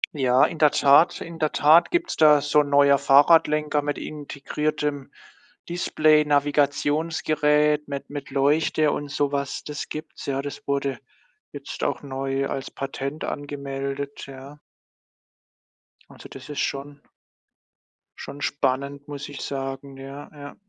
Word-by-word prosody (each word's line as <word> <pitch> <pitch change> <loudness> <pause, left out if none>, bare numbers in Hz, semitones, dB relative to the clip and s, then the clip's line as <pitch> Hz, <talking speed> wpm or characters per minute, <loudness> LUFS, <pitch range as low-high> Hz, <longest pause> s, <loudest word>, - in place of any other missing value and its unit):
Ja, 130 -2 +4
in 165 - -5
der 150 -2 +6
Tat 140 +5 +4
in 165 0 -8
der 155 -1 0
Tat 155 +4 +5
gibt's 345 -1 -1
da 150 -2 +6
so 145 +1 +2
'n 145 -1 +1
neuer 140 0 +5
Fahrradlenker 150 +1 +4
mit 145 0 -3
integriertem 145 -1 -4 0.6
Display-Navigationsgerät, 150 -1 +2
mit 140 0 -6
mit 145 -1 -6
Leuchte 145 +2 +2
und 145 -1 -4
so 145 0 -1
was. 140 -1 -3
Das 150 -1 -6
gibt's, 155 -1 -8
ja, 135 0 -2
das 145 - -8
wurde 140 -2 -1 0.5
jetzt - - -7
auch - - -2
neu 135 0 -2
als 135 -1 -5
Patent 135 +2 -5
angemeldet, 140 -1 -5
ja. 135 +2 -11 1.5
Also, - - -13
das 135 +2 -11
ist 145 - -5
schon 140 +1 -3 1.2
schon 145 - -9
spannend, 140 +1 -2
muss 145 -1 -7
ich 145 - -8
sagen. 135 0 -5
Ja, 135 +2 -9
ja. 145 -1 -10
145 Hz, 130 wpm, -24 LUFS, 140-150 Hz, 1.5 s, der